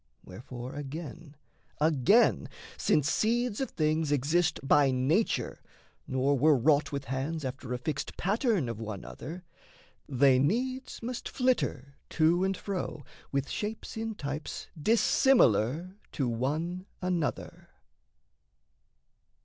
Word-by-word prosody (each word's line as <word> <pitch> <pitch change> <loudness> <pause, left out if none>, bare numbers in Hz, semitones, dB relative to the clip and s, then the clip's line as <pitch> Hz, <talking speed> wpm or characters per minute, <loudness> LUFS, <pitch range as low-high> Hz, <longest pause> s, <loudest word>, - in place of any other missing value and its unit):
Wherefore 120 +6 -8
again, 150 +2 -7 0.4
again, 155 - +3 0.3
since 150 -2 +2
seeds 235 - +1
of 265 - -1
things 155 -1 0
Exist 155 +4 +1
by 140 0 +4
nature, 135 - 0 0.5
nor 130 +2 +1
were 150 +1 +5
wrought 145 +5 +3
with 140 -1 -4
hands 135 +4 -3
After 130 -1 -6
a 125 - 0
fixed 140 +3 -4
pattern 205 - +1
of 115 -2 -5
one 110 -3 -6
other, 175 +5 -8 0.7
They 130 -1 +4
needs 255 - -1
must 245 +1 -4
flitter 240 - -1 0.2
to 170 +3 +4
and 190 0 0
fro 180 -7 -4 0.3
with 140 0 -1
shapes 215 +1 -5
In 220 0 -3
types 145 -2 -5
dissimilar 175 - +3 0.2
to 135 - -1
one 155 - -2
another. 180 -4 -3
155 Hz, 115 wpm, -29 LUFS, 135-190 Hz, 0.7 s, were